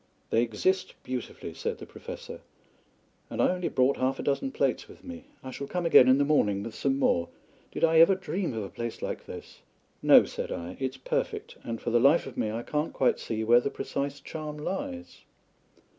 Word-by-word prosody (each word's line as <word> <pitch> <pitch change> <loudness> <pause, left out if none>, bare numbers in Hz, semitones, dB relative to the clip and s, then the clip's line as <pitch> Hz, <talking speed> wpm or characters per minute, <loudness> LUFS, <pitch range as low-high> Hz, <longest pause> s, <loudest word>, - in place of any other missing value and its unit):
"They 115 - +4
exist 120 - 0
beautifully," 125 -1 -5
said 460 -1 -3
the - - -9
Professor; - - -9 0.9
"and - - -6
I - - +4
only 180 -1 -2
brought 130 +2 +2
half 130 +1 0
a - - -5
dozen 145 - 0
plates - - 0
with - - -15
me. 255 -1 -9 0.2
I 130 - -6
shall 140 +2 -6
come 180 +2 -2
again 130 -6 +7
in 130 +1 +6
the 140 - +3
morning 105 -10 +2
with 115 - -6
some 135 +4 0
more. 85 -10 +2 0.4
Did - - -5
I 165 0 +5
ever 170 +4 +7
dream 185 - -3
of 110 - -2
a 100 - -6
place 115 +2 -6
like - - -4
this?" - - -10 0.4
"No," - - +7
said - - -5
I. 85 +2 -5
"It's 130 0 -3
perfect, 130 - -3
and 115 -1 -4
for 120 - -3
the 120 - +4
life 140 +7 +5
of 135 - -8
me 110 - -1
I 115 +2 -4
can't 150 +4 -2
quite 130 - +2
see 110 -1 -3
where 120 +2 +6
the 140 - -1
precise 140 0 -4
charm 150 +1 -6
lies." 260 - -5
140 Hz, 205 wpm, -28 LUFS, 120-180 Hz, 0.9 s, again